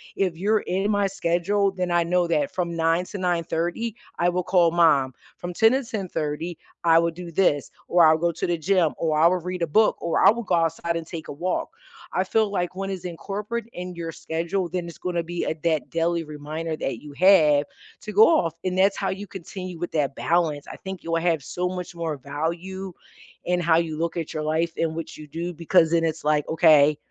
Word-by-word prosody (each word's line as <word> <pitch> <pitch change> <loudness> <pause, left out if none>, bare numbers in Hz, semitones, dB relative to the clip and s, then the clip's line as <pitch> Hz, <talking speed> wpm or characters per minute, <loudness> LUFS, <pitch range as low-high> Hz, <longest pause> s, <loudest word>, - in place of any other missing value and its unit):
If 185 -4 0
you're 210 +4 +2
in 195 +1 -1
my 205 -1 +2
schedule, 195 +2 0
then 180 -2 -3
I 175 0 +3
know 175 +1 +1
that 280 - 0
from 175 -2 -2
9 165 +1 +2
to 205 - -7
09:30, 175 +4 -1 0.2
I 175 +1 +2
will 180 +1 -1
call 175 -2 +3
mom. 150 -6 +3 0.2
From 175 0 -6
10 225 +6 +4
to 270 +1 +1
10:30, 175 - -4 0.3
I 165 -1 +6
will 170 0 +1
do 175 +1 -9
this, 155 -5 +2 0.2
or 175 -1 +6
I'll 155 0 +6
go 170 +1 +1
to 165 - -3
the 175 - 0
gym, 170 -1 +2
or 155 -2 0
I 165 - +7
will 180 +1 +1
read 180 +1 -5
a - - 0
book, 215 +8 +3
or 170 - +1
I - - +9
will 235 +2 -4
go 185 -4 +1
outside 165 0 0
and 165 -1 -3
take 160 -1 -7
a - - -6
walk. 180 +5 -2 0.4
I 185 - +2
feel 215 +2 +1
like 180 -2 -2
when 195 +1 -4
it's 190 -3 -5
incorporate 205 +6 -4
in 180 0 -6
your 165 -1 -5
schedule, 170 +3 -3
then 175 0 -3
it's 170 - -10
gonna 175 -2 -2
be 175 +1 -4
a - - 0
that 160 -3 0
daily 165 0 0
reminder 155 +2 -5
that 125 -6 -4
you 150 -1 -11
have 150 -4 +5 0.4
to 210 - -6
go 210 +2 +7
off. 170 - +2
And 185 0 -1
that's 195 +1 +3
how 195 - -1
you 195 +2 -4
continue 185 -2 -8
with 175 - -4
that 145 -3 0
balance. 160 -4 0
I - - -8
think 190 -2 -8
you 165 - -5
will 165 0 +1
have 165 -4 +1
so 180 +6 -2
much 180 -1 -6
more 165 -3 -3
value 170 +7 -4 0.5
in 180 0 +1
how 170 -2 +3
you 160 -2 -1
look 170 +1 -2
at 165 -2 -4
your 155 - -3
life 160 +2 0
and 160 -1 -1
what 165 -1 -6
you 155 - -10
do, 170 +4 -5
because 165 0 +3
then 165 -1 +3
it's 165 -1 -2
like, 150 -1 +1
okay, 155 -3 +5
170 Hz, 225 wpm, -24 LUFS, 160-185 Hz, 0.5 s, I